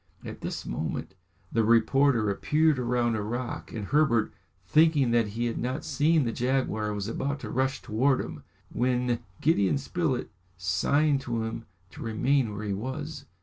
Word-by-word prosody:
At - - -8
this - - -4
moment - - -4 0.4
the 115 - +2
reporter 115 0 +3
appeared 150 +7 +2
round 120 -1 +1
a 110 - -1
rock, 120 +4 -4
and 105 -3 -4
Herbert, 140 -4 +2 0.3
thinking 150 - +4
that 115 -2 +3
he 115 +3 -3
had 115 - -2
not 130 +4 -3
seen 155 +1 +2
the 115 - -1
jaguar, 120 -4 0
was 100 -1 -3
about 140 +5 -2
to - - -6
rush 130 +1 0
towards 130 +5 +1
him, - - -8 0.3
when 125 -1 +1 0.2
Gideon 140 - +3
Spilett 140 -1 -2 0.3
signed 135 +11 +2
to 120 -3 -2
him 115 0 -5 0.3
to - - -11
remain 120 +2 +1
where 105 +1 -5
he 100 - -1
was. 145 +7 -5
125 Hz, 160 wpm, -28 LUFS, 110-140 Hz, 0.4 s, thinking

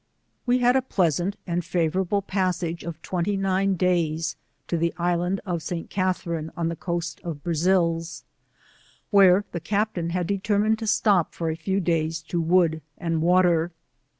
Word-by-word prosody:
We 245 +1 +4
had 245 0 +3
a 265 - +4
pleasant 180 - 0
and 175 -1 -1
favourable 180 +4 0
passage 180 -3 -1
of 170 -1 -6
twenty 185 +2 -1
nine 195 0 +1
days 165 -3 0 0.3
to - - -1
the 170 +1 0
Island 175 +2 0
of 175 -3 -2
St. 165 +1 -5
Catherine 170 -4 -1
on 165 -1 0
the 165 - -3
coast 170 0 -4
of 160 -4 -6
Brazils, 170 -1 0 0.9
where 195 -1 +6
the 170 - -3
Captain 200 -1 -1
had 180 0 -1
de* 200 +3 -1
termined 215 +2 +1
to 225 - -4
stop 205 -4 +2
for 165 -1 -1
a - - -3
few 190 +4 -1
days 165 -2 -1
to 170 +2 -2
wood 165 -1 +2 0.2
and 165 -2 -1
water. 175 -1 +3
175 Hz, 160 wpm, -25 LUFS, 165-190 Hz, 0.9 s, where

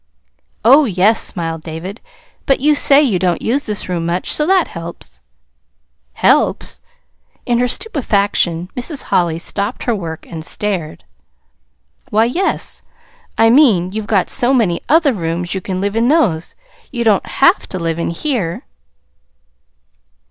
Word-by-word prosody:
"Oh, 275 +5 +7
yes," 210 +1 +2
smiled 165 -2 -3
David. 165 +6 -7 0.5
"But 270 - +3
you 300 +3 +3
say 285 0 +5
you 215 -10 +1
don't 175 -2 0
use 270 +5 -1
this 210 -2 -2
room 175 -2 -2
much, 175 +2 -2
so 300 - 0
that 375 -2 +3
helps." 165 - -10 0.9
"Helps!" - - +1 0.6
In 240 -1 +1
her 250 - +2
stupefaction 200 - 0
Mrs. 265 +3 -3
Holly 170 -2 0
stopped 200 +6 -4
her 240 - 0
work 165 -6 -6
and 160 -2 -8
stared. 180 -3 -4 1.1
"Why, 220 -1 +3
yes. 355 +11 -2 0.6
I 225 0 +5
mean, 220 - +4
you've 215 +1 -5
got 195 -4 +1
so 250 +2 +2
many 195 -9 +1
other 305 -3 +4
rooms 170 -2 -3
you 190 - -3
can 185 0 -4
live 200 +2 -2
in 230 +1 +2
those. 225 - +1 0.4
You 240 -3 -2
don't 215 -4 +3
HAVE 305 +9 +2
to 185 - -4
live 165 -1 -2
in - - -1
here." 185 - -3
205 Hz, 145 wpm, -16 LUFS, 170-255 Hz, 1.1 s, Oh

